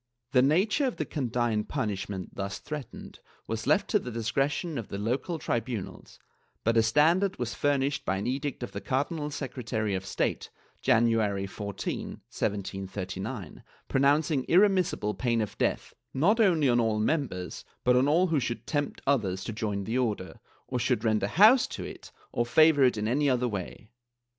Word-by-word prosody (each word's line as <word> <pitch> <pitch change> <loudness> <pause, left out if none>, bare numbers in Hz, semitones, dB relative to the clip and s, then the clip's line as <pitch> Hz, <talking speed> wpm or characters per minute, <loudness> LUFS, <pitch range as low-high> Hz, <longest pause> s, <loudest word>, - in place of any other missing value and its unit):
The 125 - +5
nature 190 - +3
of 255 - -2
the 155 - -2
condign 120 -6 -1
punishment 100 -8 -4
thus 100 0 -4
threatened 150 -5 -8 0.3
was 115 0 -4
left 205 0 +3
to 210 - +4
the 125 - -7
discretion 135 +6 -1
of 115 - -6
the 100 - -5
local 125 - -2
tribunals, 120 -7 -4 0.5
but 115 +1 +2
a 115 - +6
standard 165 - +3
was 120 -2 -3
furnished 140 0 0
by 95 - 0
an 100 - -3
edict 135 +1 -2
of 120 - -5
the - - -6
Cardinal 150 +3 -1
Secretary 125 -7 -3
of 95 0 -2
State, - - -2 0.3
January 115 -5 +2
14, 100 0 -4 0.3
1739, 95 +1 -4 0.3
pronouncing 140 +1 +2
irremissible 185 - +3
pain 115 +3 0
of 105 -2 -3
death, - - -1 0.2
not 190 - +3
only 170 -9 +4
on 120 -1 +3
all 110 -2 +1
members 110 - -2 0.2
but 125 0 +4
on 130 +2 +4
all 165 +5 +4
who 165 -5 +1
should 120 -2 -3
tempt 145 -2 -2
others 100 -9 +1
to 115 - -5
join 105 -3 -2
the 115 +6 -1
Order, 105 -7 -2 0.3
or 125 - -2
should 110 -1 0
rent 110 -2 +2
a 100 - +1
house 215 - +6
to - - -6
it - - -9 0.2
or 120 - +1
favor 155 +3 +5
it 125 -3 +3
in 105 0 -1
any 140 +5 +2
other 125 -1 +1
way. 105 +1 -6
125 Hz, 170 wpm, -28 LUFS, 105-145 Hz, 0.5 s, a